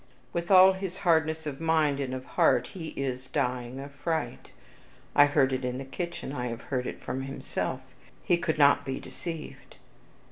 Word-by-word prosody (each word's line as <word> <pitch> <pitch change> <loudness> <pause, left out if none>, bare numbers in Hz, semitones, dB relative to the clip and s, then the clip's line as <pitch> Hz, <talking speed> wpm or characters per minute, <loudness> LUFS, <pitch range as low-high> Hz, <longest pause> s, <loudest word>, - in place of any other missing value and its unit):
"With 170 0 -2
all 190 0 +8
his 190 -1 -5
hardness 160 -2 +2
of 145 0 -5
mind, 155 -3 +2
and 135 -2 -2
of 130 0 -7
heart, - - +2
he 170 -5 -6
is 130 -1 -3
dying 125 0 -2
of 135 - -6
a - - -9
fright. 160 +3 -3 0.7
I 145 - +8
heard 140 -2 +3
it 130 0 -2
in 125 0 -2
the 135 - -6
kitchen, 170 0 -5
I 125 -3 -2
have 120 0 -5
heard 125 -1 0
it - - -6
from 130 +1 -3
himself, 135 +1 -4 0.4
he 175 - +3
could 160 -2 -1
not 145 -1 +5
be 135 -2 -3
deceived. 165 -3 -8
145 Hz, 185 wpm, -28 LUFS, 130-165 Hz, 0.7 s, all